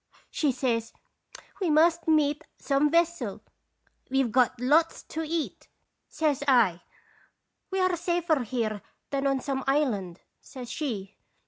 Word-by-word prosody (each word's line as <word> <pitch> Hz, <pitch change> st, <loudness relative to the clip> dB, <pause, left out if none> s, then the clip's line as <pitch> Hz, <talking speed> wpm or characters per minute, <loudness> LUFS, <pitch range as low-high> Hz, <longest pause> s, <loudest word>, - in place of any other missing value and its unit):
" -, -, -30 dB
She 295 Hz, -3 st, +1 dB
says: 235 Hz, -3 st, -1 dB, 0.7 s
'We 365 Hz, -, +1 dB
must 330 Hz, +2 st, +3 dB
meet 300 Hz, -1 st, +2 dB
some 280 Hz, +1 st, +1 dB
vessel.' 335 Hz, -, 0 dB, 0.2 s
" -, -, -50 dB
' -, -, -40 dB
We 270 Hz, +1 st, +2 dB
've 235 Hz, -, -3 dB
got 250 Hz, 0 st, +2 dB
lots 305 Hz, +6 st, +2 dB
to 320 Hz, -, -5 dB
eat,' 320 Hz, 0 st, -3 dB, 0.4 s
says 300 Hz, -4 st, 0 dB
I. 220 Hz, -10 st, +4 dB, 0.3 s
" -, -, -33 dB
' -, -, -53 dB
We 385 Hz, -, -2 dB
are 370 Hz, -1 st, +2 dB
safer 345 Hz, -3 st, 0 dB
here 220 Hz, -3 st, -2 dB, 0.3 s
than 275 Hz, 0 st, 0 dB
on 270 Hz, -1 st, +1 dB
some 270 Hz, -1 st, -2 dB
island,' 215 Hz, -, 0 dB, 0.2 s
says 250 Hz, -3 st, -9 dB
she. 210 Hz, -10 st, -4 dB
275 Hz, 155 wpm, -27 LUFS, 245-320 Hz, 0.7 s, I